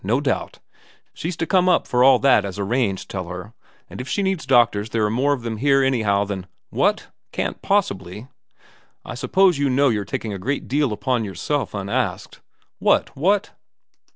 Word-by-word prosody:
No 115 Hz, +7 st, +1 dB
doubt. 140 Hz, -2 st, -2 dB, 0.6 s
She's 170 Hz, +1 st, -5 dB
to 165 Hz, -, -1 dB
come 185 Hz, +1 st, +3 dB
up 175 Hz, -, +3 dB
for 125 Hz, 0 st, +2 dB
all 135 Hz, +1 st, +7 dB
that 135 Hz, -6 st, +4 dB
as 100 Hz, 0 st, -6 dB
arranged, 100 Hz, -1 st, -1 dB
tell 95 Hz, -3 st, -5 dB
her, 90 Hz, +4 st, -8 dB, 0.3 s
and -, -, -8 dB
if 125 Hz, -, -8 dB
she 200 Hz, -, 0 dB
needs 190 Hz, -7 st, -2 dB
doctors 115 Hz, -5 st, +3 dB
there 115 Hz, -2 st, 0 dB
are 105 Hz, -, 0 dB
more 130 Hz, +5 st, +1 dB
of 135 Hz, -4 st, -1 dB
them 115 Hz, -2 st, -4 dB
here 135 Hz, +3 st, +3 dB
anyhow 110 Hz, -7 st, +1 dB
than 95 Hz, -2 st, -5 dB, 0.2 s
what? -, -, 0 dB, 0.2 s
Can't -, -, -3 dB
possibly? 105 Hz, -, -1 dB, 0.3 s
' -, -, -30 dB
' -, -, -39 dB
I -, -, -6 dB
suppose 165 Hz, +6 st, +2 dB
you 140 Hz, -1 st, +1 dB
know 135 Hz, +2 st, +3 dB
you're 105 Hz, -3 st, 0 dB
taking 110 Hz, 0 st, -4 dB
a 95 Hz, -, -5 dB
great 135 Hz, +9 st, -3 dB
deal 140 Hz, -1 st, +1 dB
upon 120 Hz, +2 st, -1 dB
yourself 120 Hz, +7 st, -3 dB
unasked 100 Hz, 0 st, -3 dB, 0.2 s
' -, -, -42 dB
'What? -, -, +2 dB
What?' 195 Hz, +8 st, +1 dB
125 Hz, 195 wpm, -22 LUFS, 105-140 Hz, 0.6 s, all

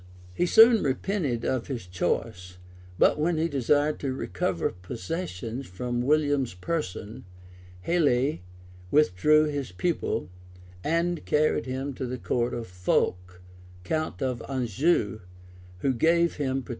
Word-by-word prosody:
} 90 Hz, -, -20 dB
He 175 Hz, -, +1 dB
soon 225 Hz, +3 st, +7 dB
repented 140 Hz, -, -1 dB
of 130 Hz, -3 st, -1 dB
his 125 Hz, -8 st, -5 dB
choice; 90 Hz, 0 st, -3 dB, 0.4 s
but -, -, +4 dB
when 165 Hz, +2 st, +1 dB
he 160 Hz, +1 st, +1 dB
desired 145 Hz, +1 st, +1 dB
to 135 Hz, -, -2 dB
recover 90 Hz, -5 st, -1 dB
possession 115 Hz, -, -5 dB
of 95 Hz, -9 st, -12 dB, 0.2 s
William's 145 Hz, -5 st, +1 dB
person, 105 Hz, -, -4 dB, 0.6 s
Helie 145 Hz, -, +2 dB, 0.5 s
withdrew 150 Hz, +3 st, +4 dB
his 145 Hz, -7 st, -3 dB
pupil, 165 Hz, -, -2 dB, 0.5 s
and 170 Hz, +1 st, 0 dB
carried 150 Hz, -1 st, +1 dB
him 135 Hz, +2 st, -3 dB
to 130 Hz, 0 st, -4 dB
the 125 Hz, +1 st, -4 dB
court 120 Hz, 0 st, -1 dB
of 120 Hz, -1 st, -4 dB
Fulk, 90 Hz, 0 st, -1 dB, 0.4 s
count 155 Hz, -, -2 dB
of 125 Hz, -3 st, -2 dB
Anjou, 125 Hz, -, +1 dB, 0.6 s
who 135 Hz, -, +2 dB
gave 170 Hz, +7 st, +2 dB
him 135 Hz, -2 st, -1 dB
protection. -, -, -18 dB
135 Hz, 130 wpm, -27 LUFS, 110-155 Hz, 0.6 s, soon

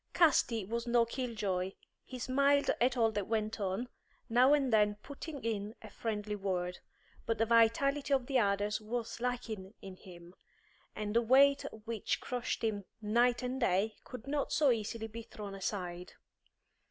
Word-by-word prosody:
Casti 250 Hz, -, +3 dB
was 235 Hz, +3 st, -3 dB
no 235 Hz, -1 st, +4 dB
kill 240 Hz, 0 st, -4 dB
joy; 190 Hz, -2 st, -2 dB, 0.3 s
he 255 Hz, -, -8 dB
smiled 280 Hz, +3 st, +3 dB
at 250 Hz, +1 st, +3 dB
all 225 Hz, -2 st, +3 dB
that 205 Hz, -2 st, -3 dB
went 220 Hz, 0 st, -1 dB
on, 200 Hz, +5 st, -2 dB, 0.4 s
now 250 Hz, +4 st, +5 dB
and 275 Hz, -5 st, +3 dB
then 210 Hz, -1 st, +4 dB
putting 285 Hz, 0 st, -8 dB
in 215 Hz, -1 st, -3 dB
a -, -, -10 dB
friendly 210 Hz, -2 st, -3 dB
word; 180 Hz, -3 st, -2 dB, 0.5 s
but 225 Hz, -, +1 dB
the 225 Hz, -, +2 dB
vitality 235 Hz, +6 st, +3 dB
of 265 Hz, -3 st, +3 dB
the 265 Hz, -1 st, +2 dB
others 205 Hz, 0 st, +1 dB
was 230 Hz, +2 st, -4 dB
lacking 230 Hz, -5 st, -4 dB
in 190 Hz, -1 st, -10 dB
him, 175 Hz, -2 st, -13 dB, 0.6 s
and 210 Hz, 0 st, -3 dB
the 235 Hz, -, +5 dB
weight 275 Hz, +4 st, +5 dB, 0.2 s
which 230 Hz, -3 st, -2 dB
crushed 245 Hz, -2 st, -3 dB
him 205 Hz, -3 st, -1 dB
night 240 Hz, +3 st, +2 dB
and 255 Hz, +1 st, -2 dB
day 205 Hz, 0 st, +2 dB
could 250 Hz, -3 st, -9 dB
not 285 Hz, 0 st, -1 dB
so 290 Hz, -4 st, +4 dB
easily 225 Hz, 0 st, -2 dB
be 225 Hz, +1 st, -7 dB
thrown 210 Hz, -3 st, -8 dB
aside. 180 Hz, -2 st, -4 dB
225 Hz, 165 wpm, -33 LUFS, 205-250 Hz, 0.6 s, now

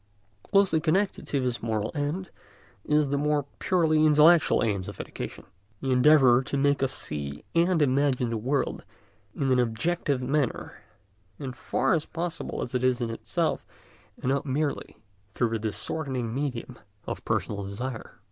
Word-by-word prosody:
Closely 195 Hz, -, +3 dB
connected 180 Hz, +6 st, 0 dB
with 140 Hz, -3 st, +1 dB
this 125 Hz, -1 st, -2 dB
moral 110 Hz, -2 st, -1 dB
end 155 Hz, +5 st, -3 dB, 0.5 s
is 150 Hz, -1 st, +2 dB
the 140 Hz, 0 st, 0 dB
more 150 Hz, -1 st, +1 dB
purely 160 Hz, -4 st, +2 dB
intellectual 155 Hz, +1 st, +5 dB
aim 105 Hz, -4 st, 0 dB
of -, -, -8 dB
education, -, -, -6 dB, 0.4 s
the 135 Hz, -, -2 dB
endeavour 130 Hz, -1 st, +6 dB
to 135 Hz, +2 st, -3 dB
make 140 Hz, 0 st, +2 dB
us 135 Hz, -1 st, +1 dB
see 70 Hz, -, -5 dB
and 170 Hz, -1 st, +3 dB
imagine 130 Hz, -3 st, +1 dB
the 115 Hz, -, -1 dB
world 130 Hz, +5 st, -1 dB, 0.5 s
in 135 Hz, -2 st, 0 dB
an 125 Hz, -, +4 dB
objective 130 Hz, +5 st, 0 dB
manner, 135 Hz, 0 st, -2 dB, 0.6 s
as 135 Hz, -2 st, -4 dB
far 125 Hz, -, 0 dB
as 160 Hz, -3 st, 0 dB
possible 170 Hz, 0 st, -4 dB
as 120 Hz, -, -7 dB
it 125 Hz, 0 st, 0 dB
is 130 Hz, -1 st, +2 dB
in 120 Hz, -2 st, -2 dB
itself, 115 Hz, -, -1 dB, 0.5 s
and 125 Hz, -, -3 dB
not 140 Hz, +1 st, +1 dB
merely 145 Hz, +1 st, -2 dB, 0.3 s
through 115 Hz, +3 st, 0 dB
the 115 Hz, 0 st, -2 dB
distorting 120 Hz, +2 st, -3 dB
medium 130 Hz, -3 st, -4 dB, 0.3 s
of -, -, -5 dB
personal 100 Hz, -1 st, -1 dB
desire. 110 Hz, +5 st, -6 dB
135 Hz, 155 wpm, -27 LUFS, 120-150 Hz, 0.6 s, endeavour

